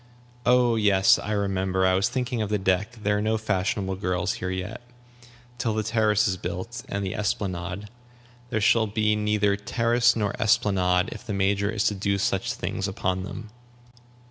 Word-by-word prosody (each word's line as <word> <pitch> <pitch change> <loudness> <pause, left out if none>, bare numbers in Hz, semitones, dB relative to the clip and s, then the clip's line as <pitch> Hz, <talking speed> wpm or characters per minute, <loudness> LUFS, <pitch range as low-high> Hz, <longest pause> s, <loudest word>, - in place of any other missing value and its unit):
"Oh 125 -2 +4
yes, 100 -3 +4
I 105 - -5
remember! 95 -2 0
I 95 - +4
was 95 +6 +2
thinking 125 -2 -2
of 105 - -2
the 105 - +1
deck. 95 +4 0
There 105 0 +1
are - - -1
no 110 +1 +1
fashionable 100 -2 -1
girls 90 0 -1
here 95 - -2
yet. 95 +6 -5 0.8
Till 115 -4 0
the 110 - 0
terrace 110 -1 +2
is 95 -1 -1
built, 95 +8 -5
and 100 0 -2
the 95 - -3
esplanade 95 -1 -3 0.3
" 120 0 -27
"There 110 - -1
shall 110 +1 +4
be 105 +1 +1
neither 105 -1 +1
terrace 115 +3 +2
nor 105 -3 -1
esplanade 95 -6 +2
if 110 - -8
the 105 - -4
Major 100 +1 +1
is 110 -2 -1
to 105 - +2
do 100 0 -1
such 95 -1 0
things 100 - -3
upon 95 -1 -2
them." 105 +3 -8
105 Hz, 180 wpm, -25 LUFS, 95-110 Hz, 0.8 s, Oh